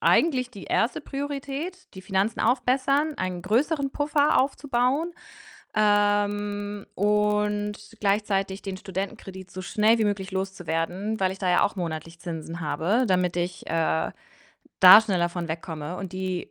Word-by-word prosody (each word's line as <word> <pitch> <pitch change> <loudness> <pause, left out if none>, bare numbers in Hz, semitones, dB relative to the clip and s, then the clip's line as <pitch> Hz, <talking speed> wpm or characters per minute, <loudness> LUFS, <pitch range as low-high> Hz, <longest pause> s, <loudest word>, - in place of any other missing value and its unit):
eigentlich 255 -6 +3
die 200 - -9
1. 230 - 0
Priorität, 285 +5 -5
die 190 - -9
Finanzen 195 +3 0
aufbessern, 265 +5 +2
einen 180 -1 -3
größeren 275 - +1
Puffer 290 +1 +2
aufzubauen, 275 +4 0 0.6
ähm, 205 -1 +1
und 210 0 +1 0.3
gleichzeitig 195 -1 0
den 195 -1 -5
Studentenkredit 190 0 -6
so 185 - -7
schnell 215 +5 +3
wie 220 - +2
möglich 200 -1 -1
loszuwerden, 190 +2 -2
weil 185 0 +2
ich 190 - -10
da 185 -2 0
ja 180 - +4
auch - - -1
monatlich 165 -1 -5
Zinsen 165 0 -6
habe, 180 +9 +1
damit 180 -1 +1
ich, 175 +1 -3
äh, 160 0 0 0.7
da 185 +3 +11
schneller 185 -5 +1
von 175 -1 -4
wegkomme 160 0 -5
und 190 -2 -6
die 185 -1 -3
205 Hz, 140 wpm, -25 LUFS, 185-235 Hz, 0.7 s, da